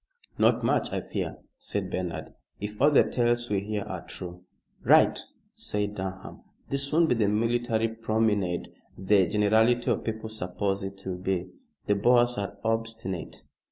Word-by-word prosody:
"Not - - +4
much, - - +1
I - - -1
fear," - - -4 0.2
said 100 -2 -3
Bernard, 90 -2 -4 0.3
"if 105 +2 -6
all 145 - +7
the 145 - +6
tales 120 -1 0
we 100 - +2
hear 105 +1 -3
are - - -6
true." 90 0 -9 0.4
"Right," - - +5 0.3
said 105 0 -2
Durham. 95 -1 -6 0.3
"This 140 0 +1
won't 165 +1 +4
be - - +4
the 110 -4 +2
military 115 +1 +1
promenade 110 -5 0 0.3
the 95 -1 +3
generality 110 +5 +3
of - - -1
people 110 0 -4
suppose 100 -1 -2
it 95 0 -6
will 90 -1 -3
be. 95 -1 -2 0.3
The 105 - +3
Boers 120 +2 +3
are 100 0 -4
obstinate." 115 -5 -3
105 Hz, 155 wpm, -27 LUFS, 95-115 Hz, 0.4 s, all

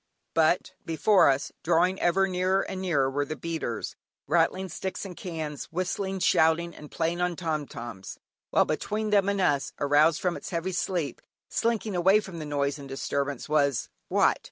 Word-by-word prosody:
But, 165 +2 +2
before 180 +2 +4
us, 135 +1 0
drawing 175 +3 +2
ever 195 +3 +3
nearer 185 +1 +1
and 190 -1 -5
nearer, 155 -8 +2
were 140 +2 0
the 155 +2 -5
beaters, 160 -9 -4 0.3
rattling 170 +5 +2
sticks 190 +4 -4
and 185 -2 -7
cans, 160 -5 -5
whistling, 190 +2 -2
shouting, 165 +1 +3
and 150 - -11
playing 170 +2 -1
on 180 -1 0
"tom 155 -4 -2
toms," 115 -6 -8 0.3
while - - +4
between 215 0 -2
them 200 -1 +4
and 200 0 0
us, 145 -7 +1
aroused 150 +2 +4
from 180 0 0
its - - -7
heavy 175 +1 -2
sleep, 175 -4 -2 0.3
slinking 225 -3 0
away 190 +4 +5
from 190 -5 -7
the 155 - -5
noise 145 0 -1
and 140 -1 -9
disturbance 140 0 -2
was 140 -4 +1 0.2
what? - - +3
165 Hz, 170 wpm, -27 LUFS, 145-185 Hz, 0.3 s, away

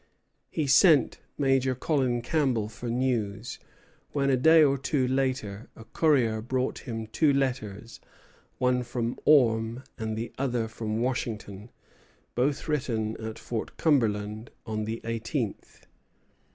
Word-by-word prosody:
He 155 - -1
sent 145 - +5 0.2
Major 135 -2 +2
Colin 130 -3 0
Campbell 125 -7 0
for 120 +2 -7
news; 115 -3 -1 0.5
when, 140 -1 +1
a - - +4
day 160 +5 +6
or 140 -2 +4
two 135 -1 0
later, 130 -5 -2
a 115 - -11
courier 120 -5 +2
brought 130 +3 -2
him 115 -3 -5
two 145 +7 +2
letters, 125 -5 -2 0.6
one 125 0 +2
from 120 -1 -3
Orme, 115 -4 +3 0.2
and 110 -1 -3
the 115 +2 -5
other 125 -4 0
from 110 0 -3
Washington, 110 -4 -4 0.6
both 135 +5 0
written 115 -8 -1
at 110 0 -6
Fort 115 -2 -5
Cumberland 110 -7 +1 0.2
on 110 -1 -3
the 115 +1 -4
eighteenth. 115 0 -4
120 Hz, 125 wpm, -27 LUFS, 110-135 Hz, 0.6 s, day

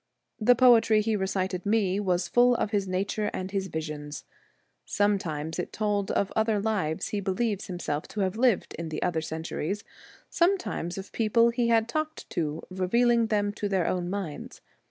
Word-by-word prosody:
The 245 +3 +5
poetry 230 -3 +5
he 220 0 0
recited 190 -2 -1
me 200 -2 +1
was 180 -3 0
full 245 0 +4
of 215 - -1
his 200 -3 0
nature 200 +3 -1
and 185 0 -4
his 195 -1 -1
visions. 150 -3 -5 0.6
Sometimes 170 -6 -1
it 180 - -3
told 205 -2 -1
of 200 - 0
other 220 -1 +2
lives 200 -7 -1
he 210 - -2
believes 200 +1 -1
himself 175 -4 -3
to 210 - -4
have 190 0 0
lived 235 -3 +2
in 165 -1 -4
other 170 -3 0
centuries, 160 +4 -4 0.4
sometimes 340 - 0
of 195 - -7
people 230 +1 +3
he 235 0 0
had 225 -1 +3
talked 310 +5 -3
to, 155 -1 -2
revealing 230 +5 +2
them 205 -1 0
to 205 -1 -3
their 190 -3 +1
own 175 -1 -1
minds. 190 -6 -5
200 Hz, 165 wpm, -27 LUFS, 180-225 Hz, 0.6 s, The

